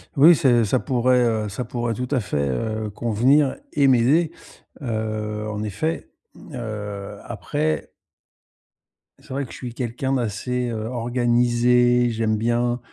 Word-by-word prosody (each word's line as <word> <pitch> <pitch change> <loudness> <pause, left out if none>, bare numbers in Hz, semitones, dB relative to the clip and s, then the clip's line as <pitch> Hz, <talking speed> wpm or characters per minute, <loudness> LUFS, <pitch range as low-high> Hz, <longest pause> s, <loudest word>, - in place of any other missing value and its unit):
Oui, 160 +5 +8
c'est 120 -5 +3
ça 110 +4 +1
pourrait, 125 -1 +2
heu, 110 -3 0
ça 115 +5 -4
pourrait 120 -1 -2
tout 125 +3 -4
à 140 - +2
fait, 90 -9 -2
heu, 110 - -2
convenir 120 +7 +2 0.2
et 140 -2 +4
m'aider. 135 +7 +4 0.5
Heu, 110 -3 -3
en 105 0 -4
effet, 110 +11 -3 0.3
hem, 150 - -14
heu, 105 -4 -6
après 75 -1 -2 1.3
c'est - - -20
vrai 140 0 -2
que - - -14
je - - -9
suis 125 -2 -6
quelqu'un 125 +2 -2
d'assez, 125 +1 -1
heu, 110 -2 -4
organisé. 120 0 +2
J'aime 110 -1 0
bien, 120 +2 0
120 Hz, 145 wpm, -23 LUFS, 110-125 Hz, 1.3 s, Oui